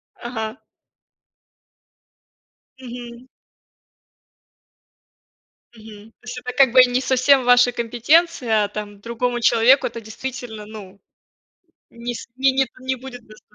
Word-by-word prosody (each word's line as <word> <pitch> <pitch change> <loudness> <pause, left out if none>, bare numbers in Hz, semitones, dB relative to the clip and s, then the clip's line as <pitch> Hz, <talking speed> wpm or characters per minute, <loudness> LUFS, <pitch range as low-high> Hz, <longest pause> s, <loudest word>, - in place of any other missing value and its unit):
Ага. 225 0 -6 2.2
Мгм. 245 -1 -10 2.5
Мгм. 215 -1 -14
То - - -49
есть 245 +1 -7
это 250 0 -6
как 270 -3 +5
бы 255 - +9
и 255 - +5
не 250 +1 0
совсем 260 +1 +3
ваша 245 0 +5
компетенция, 240 0 +1
а - - -1
там 205 -1 -7
другому 240 +3 -3
человеку 240 +3 +4
это 230 0 -8
действительно, 225 0 -8
ну, 205 -2 -12 0.9
не 235 +1 -6
с - - -8
не, 270 +1 +3
не 265 0 +1
не 260 0 -3
будет 250 -1 -11
дос 215 0 -16
240 Hz, 120 wpm, -21 LUFS, 220-255 Hz, 2.5 s, бы